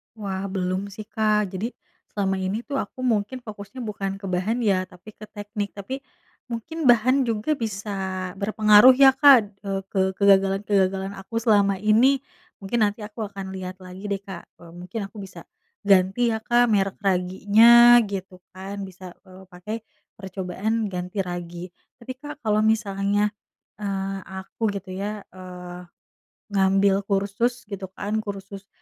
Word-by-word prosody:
Wah 200 -2 -4
belum 190 +1 -2
sih 200 +2 -9
Kak, 210 -3 +1
jadi 210 +6 -4 0.4
selama 195 -2 -1
ini 190 +5 -2
tuh 280 0 -3
aku 255 +5 -6
mungkin 240 +1 -1
fokusnya 215 +3 -8
bukan 200 -3 -4
ke - - -7
bahan 205 +7 -1
ya, 185 -3 +1
tapi 180 +4 -14
ke 215 - -12
teknik. 205 -1 -6
Tapi, 205 +7 -5 0.5
mungkin 260 +6 -4
bahan 250 +3 +4
juga 230 +7 -1
bisa 195 -3 -4
berpengaruh 215 +4 +6
ya 270 0 +7
Kak, 250 -8 +5
e - - -3 0.2
ke 195 - +1
kegagalan-kegagalan 195 -1 +2
aku 195 +4 -10
selama 205 -4 +3
ini. 230 +7 +3 0.4
Mungkin 225 +4 -1
nanti 210 +1 -6
aku 215 0 -6
akan 195 -1 -7
lihat 185 -1 -6
lagi 185 +2 -10
deh 200 -1 -2
Kak, 190 -4 -9
e - - -17
mungkin 180 +6 -7
aku 200 - -13
bisa 185 -3 -10 0.4
ganti 195 +5 +3
ya 220 - -1
Kak 240 +2 +3
merek 195 -2 +1
raginya, 210 +6 +6
gitu 195 -3 -6 0.2
kan, 195 +2 -6
bisa, 185 -1 -11
eee, 185 0 -14
pakai 180 +5 -6 0.4
percobaan 195 +3 -3
ganti 180 +1 -5
ragi. 175 0 -6 0.3
Tapi 255 +2 -7
Kak 295 +2 -9
kalau 215 -1 +1
misalnya, 205 -1 +1 0.5
eee, 195 -1 -3
aku 190 +4 -4
gitu 195 -1 -8
ya, 205 +2 -4
eee, 180 -1 -9 0.7
ngambil 195 0 +3
kursus 200 +5 -1
gitu 200 -2 -6
kan 215 +2 -2
kursus, 195 -1 -8
200 Hz, 150 wpm, -24 LUFS, 190-220 Hz, 0.7 s, ya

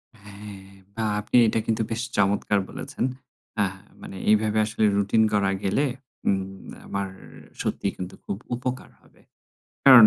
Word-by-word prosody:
হ্যাঁ। 100 -2 -10 0.3
বাহ! 110 -1 0
আপনি - - -2
এটা 110 - +2
কিন্তু 115 -1 +1
বেশ 115 +1 -1 0.2
চমৎকার 100 +1 +3
বলেছেন। 140 -1 -4 0.6
আহ 95 -1 -1 0.3
মানে - - -8
এইভাবে 110 0 +4
আসলে 110 0 -1
রুটিন 100 +2 +4
করা 100 -2 +3
গেলে, 100 +9 +2 0.4
উম 95 0 -1 0.2
আমার 100 0 -1 0.5
সত্যিই 100 - -1
কিন্তু 90 0 -5
খুব 95 - -2 0.2
উপকার 125 +1 -3
হবে। - - -24 0.6
কারন, 130 -5 +11
105 Hz, 135 wpm, -26 LUFS, 100-110 Hz, 0.6 s, কারন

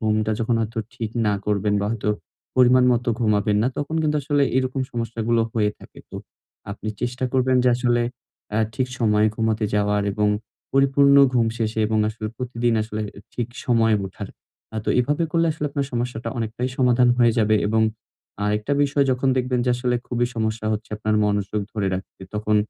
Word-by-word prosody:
ঘুমটা 110 -1 +1
যখন 115 +1 +1
হয়তো 115 +1 -3 0.2
ঠিক 115 -3 -4 0.2
না 105 - +2
করবেন 105 0 +1
বা 100 - -1
হয়তো 105 -2 -3 0.5
পরিমাণ 125 0 +6
মত 120 0 0 0.2
ঘুমাবেন 105 -2 +2
না 125 - +2
তখন 145 +2 -3
কিন্তু 150 -1 +1
আসলে 145 0 +1
এরকম 130 +1 0
সমস্যাগুলো 115 0 -1
হয়ে 105 -2 +1
থাকে। - - -15
তো - - -7 0.5
আপনি 105 +1 -6
চেষ্টা 125 +1 -2
করবেন 130 0 +2
যে - - +5
আসলে 120 -1 +1 0.5
আ - - +3 0.2
ঠিক 130 +1 -1
সময়ে 105 -2 +3
ঘুমাতে 110 -1 0
যাওয়ার 105 0 +1
এবং 105 +1 +1 0.4
পরিপূর্ণ 140 +1 +5 0.2
ঘুম 115 -2 +3
শেষে 110 0 -1
এবং 110 0 0
আসলে 110 0 -5
প্রতিদিন 120 -2 -1
আসলে 110 0 -4 0.3
ঠিক 120 -1 -2 0.2
সময়ে 115 -3 +3
উঠার। 100 +1 -8 0.5
আ - - -3
তো - - -4
এভাবে 145 +6 0
করলে 165 0 +3
আসলে 150 -1 -3
আপনার 140 -1 -2
সমস্যাটা 120 -1 -3
অনেকটাই 115 +3 -2
সমাধান 125 -1 +4
হয়ে 120 -2 +5
যাবে 110 -1 +3
এবং 110 0 +2 0.6
আ - - -2
আরেকটা 105 +6 -1
বিষয় 140 0 +1
যখন 130 +2 0
দেখবেন 125 0 0
যে - - +3
আসলে 125 0 0
খুবই 120 0 0
সমস্যা 110 0 -2
হচ্ছে 110 +1 -4
আপনার 110 0 -1
মনোযোগ 105 0 0
ধরে 105 -3 -1
রাখতে 95 0 -8
তখন 105 0 +1
115 Hz, 180 wpm, -23 LUFS, 110-125 Hz, 0.6 s, পরিমাণ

